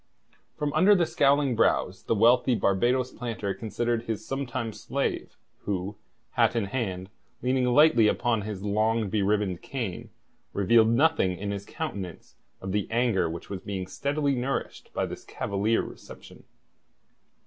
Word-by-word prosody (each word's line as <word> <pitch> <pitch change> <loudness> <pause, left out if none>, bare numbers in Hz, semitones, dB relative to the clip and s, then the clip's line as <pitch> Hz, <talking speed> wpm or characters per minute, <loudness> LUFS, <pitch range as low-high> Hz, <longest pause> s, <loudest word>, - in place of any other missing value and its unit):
From 145 -1 -2
under 190 -2 +5
scowling 140 -4 +2
brows 95 -4 +1
the - - +1
wealthy 120 +3 +4
Barbados 120 +6 +1
planter 110 -5 -4
considered 115 +2 -2
his 110 -2 -4
sometime 130 -4 -3
slave, 135 +6 -3 0.3
who, 100 0 -2 0.4
hat - - +2
in 115 -3 +1
hand, 95 -4 -3 0.3
leaning 130 0 +2
lightly 125 -2 +5
upon 120 0 +1
his 105 -2 -6
long 110 0 +1
beribboned 100 -3 0
cane, 115 -10 -5 0.4
revealed 110 +3 +4
nothing 115 - +2
in 100 +2 -3
his 100 0 -5
countenance 95 -4 -6 0.3
of 95 - -4
the 105 0 -1
anger 115 -7 +1
which 85 +4 -7
was 95 -2 -4
being 95 -2 -4
steadily 140 +8 -1
nourished 130 +2 -3
by - - -1
this - - -8
cavalier 100 +3 -1
reception. - - -12
115 Hz, 135 wpm, -27 LUFS, 100-125 Hz, 0.4 s, under